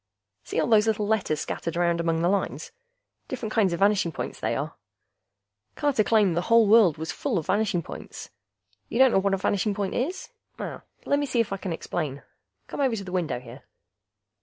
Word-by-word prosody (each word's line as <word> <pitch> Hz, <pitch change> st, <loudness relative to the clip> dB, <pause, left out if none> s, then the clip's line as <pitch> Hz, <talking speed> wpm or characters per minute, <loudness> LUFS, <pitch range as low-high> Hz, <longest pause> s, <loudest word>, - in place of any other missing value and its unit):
See -, -, -3 dB
all -, -, +2 dB
those 220 Hz, -2 st, +4 dB
little 215 Hz, -1 st, +1 dB
letters 205 Hz, -8 st, 0 dB
scattered 165 Hz, 0 st, -4 dB
around 170 Hz, -1 st, +2 dB
among 165 Hz, -1 st, 0 dB
the -, -, +3 dB
lines? 195 Hz, +1 st, -1 dB, 0.6 s
Different 225 Hz, -4 st, -5 dB
kinds 205 Hz, -5 st, +3 dB
of 170 Hz, -, -3 dB
vanishing 200 Hz, -4 st, +3 dB
points, -, -, -5 dB
they -, -, -1 dB
are. -, -, -3 dB, 1.0 s
Carter 285 Hz, -7 st, +2 dB
claimed 210 Hz, -6 st, +3 dB
the 175 Hz, -, +1 dB
whole 230 Hz, -1 st, +6 dB
world 205 Hz, -7 st, +6 dB
was 160 Hz, +1 st, -4 dB
full 250 Hz, -8 st, -2 dB
of 160 Hz, -, -2 dB
vanishing 205 Hz, -5 st, +1 dB
points. -, -, -9 dB, 0.6 s
You -, -, -3 dB
don't 260 Hz, 0 st, +6 dB
know 195 Hz, -, +4 dB
what 195 Hz, 0 st, +1 dB
a -, -, -3 dB
vanishing 200 Hz, +2 st, 0 dB
point 200 Hz, -2 st, -2 dB
is? 350 Hz, +10 st, -3 dB, 0.3 s
Lemme 285 Hz, 0 st, -3 dB
see 250 Hz, -2 st, 0 dB
if 220 Hz, -3 st, +1 dB
I -, -, -2 dB
can 185 Hz, -1 st, -5 dB
explain. 155 Hz, -4 st, -4 dB, 0.4 s
Come -, -, -8 dB
over 260 Hz, -4 st, +2 dB
to 200 Hz, -, -5 dB
the 185 Hz, -, -8 dB
window 175 Hz, -8 st, -1 dB
here. 125 Hz, -, -12 dB
200 Hz, 195 wpm, -26 LUFS, 170-225 Hz, 1.0 s, whole